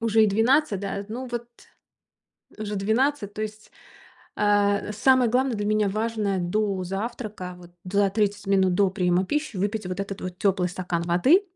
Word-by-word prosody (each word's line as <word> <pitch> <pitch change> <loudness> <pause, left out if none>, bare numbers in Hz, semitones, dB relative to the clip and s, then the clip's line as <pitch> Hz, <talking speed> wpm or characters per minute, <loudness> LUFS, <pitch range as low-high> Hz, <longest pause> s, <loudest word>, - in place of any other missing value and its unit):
Уже 225 -1 +4
и - - +4
12, 225 +1 +2
да. 200 0 -4
Ну 250 +4 -5
вот. 240 0 -4 1.1
Уже 210 -1 -4
12, 220 +2 0
то 215 - -5
есть. 215 0 -7 0.6
А, 205 0 +2
самое 255 +2 +4
главное 255 -1 +1
для 205 - -2
меня, 210 -1 +2
важное 215 -2 -1
до 190 +1 -1
завтрака, 200 -1 -5
вот 175 -1 -14
за 200 +2 +2
30 205 0 -1
минут 190 -2 +3
до 200 +1 +3
приема 180 -1 +1
пищи, 295 -4 -2
выпить 205 +1 -1
вот 185 +1 -4
этот 195 0 -5
вот 185 -1 -6
тёплый 190 -3 +1
стакан 175 -2 -3
воды. 180 - +4
205 Hz, 165 wpm, -25 LUFS, 190-220 Hz, 1.1 s, Уже